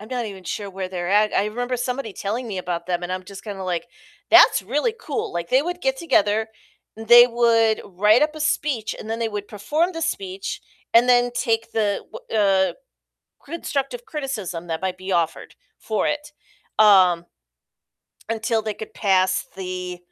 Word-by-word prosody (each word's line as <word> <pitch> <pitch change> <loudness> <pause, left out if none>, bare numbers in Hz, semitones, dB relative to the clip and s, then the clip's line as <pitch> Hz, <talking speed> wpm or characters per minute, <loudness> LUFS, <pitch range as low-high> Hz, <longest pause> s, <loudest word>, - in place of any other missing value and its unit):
I'm 215 - -11
not 245 -3 -3
even 195 -3 -9
sure 200 +3 -4
where 190 -1 -5
they're 175 -2 -4
at, 210 +2 +3
I 195 - +2
remember 245 +4 -2
somebody 250 -2 -3
telling 225 +6 -4
me 195 -3 -4
about 175 -2 -4
them, 180 -1 -1
and 175 +1 -3
I'm 185 0 -3
just 195 +1 -11
kinda 200 -3 -6
like, 185 +5 -3 0.4
"That's - - +7
really 290 - 0
cool," 440 -11 -4
like, 170 0 -4
they 260 +2 +4
would 355 +2 -4
get 265 -3 0
together, 220 -8 +1 0.5
they 240 +2 +8
would 230 -2 +3
write 210 +6 +3
up 305 0 +1
a 310 - -8
speech, 290 -7 -1
and 220 - -8
then 225 +1 -2
they 230 -1 -1
would 205 -1 -6
perform 300 - -1
the 330 -1 -5
speech, 195 - -3 0.3
and 235 +2 +5
then 245 0 +4
take 230 -1 -1
the 210 -3 0
wh - - -9
uh, 195 -3 +3 0.7
constructive 320 - -4
criticism 230 - -5
that 165 +1 -4
might 185 -1 -2
be 185 +1 -4
offered 170 -2 -1 0.2
for 215 -1 -1
it, 295 0 -3 0.5
um 185 -5 +5 1.0
Until 225 0 0
they 215 -1 -3
could 220 - -9
pass 185 -2 +2
the, 180 -1 -5
215 Hz, 180 wpm, -22 LUFS, 190-245 Hz, 1.0 s, they